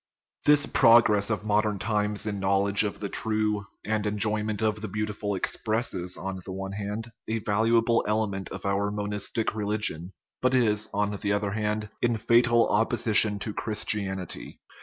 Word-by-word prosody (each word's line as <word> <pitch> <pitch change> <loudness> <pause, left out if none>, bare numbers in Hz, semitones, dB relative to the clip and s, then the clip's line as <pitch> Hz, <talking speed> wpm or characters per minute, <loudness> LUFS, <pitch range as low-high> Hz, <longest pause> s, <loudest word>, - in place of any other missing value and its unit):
This 145 -1 +6
progress 115 -4 +4
of 110 -1 -2
modern 105 0 +1
times 105 0 -1
in 105 -2 -3
knowledge 100 +1 +3
of 105 - -4
the 100 - -2
true 105 -1 -1 0.2
and 110 -1 -1
enjoyment 105 +1 0
of 105 -1 0
the 110 - -4
beautiful 105 0 -3
expresses, 100 -2 -1
on 95 0 -5
the 95 - -7
one 95 +1 -5
hand, 105 +3 -5 0.2
a 110 - -1
valuable 115 +2 +2
element 105 -3 -1
of - - -8
our 100 +1 0
monistic 105 +1 -1
religion, 105 -5 -1 0.3
but 130 0 +2
is, 110 -4 +2
on 105 0 -1
the 100 0 -2
other 105 -1 -1
hand, 105 0 -2
in 120 -1 +1
fatal 120 +1 +3
opposition 110 -1 +3
to 105 +1 -5
Chris 105 0 -1
tianity. 95 -4 -3
105 Hz, 160 wpm, -26 LUFS, 100-110 Hz, 0.3 s, This